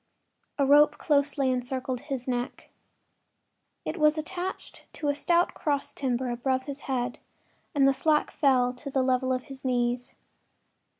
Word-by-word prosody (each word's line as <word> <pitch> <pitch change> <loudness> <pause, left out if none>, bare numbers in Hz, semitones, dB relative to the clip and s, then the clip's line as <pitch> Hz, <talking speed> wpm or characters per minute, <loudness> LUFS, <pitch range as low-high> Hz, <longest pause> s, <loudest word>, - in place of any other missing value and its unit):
A 280 - +3
rope 295 +2 +6
closely 280 -3 +1
encircled 255 0 -2
his 270 -2 -5
neck. 245 0 -3 1.1
It 330 - -3
was 305 -1 +4
attached 355 +4 -5
to 295 - -2
a - - +3
stout 340 +4 +2
cross 285 -3 -2
timber 255 -2 -1
above 260 +2 -1
his 280 +1 -6
head 245 -2 -1 0.6
and 275 -1 +5
the 275 - +4
slack 300 +3 +1
fell 255 -4 +3
to 255 +3 -7
the 265 -1 +1
level 255 0 +1
of 255 0 -1
his 270 -2 -11
knees. 245 -1 -1
270 Hz, 145 wpm, -27 LUFS, 255-295 Hz, 1.1 s, rope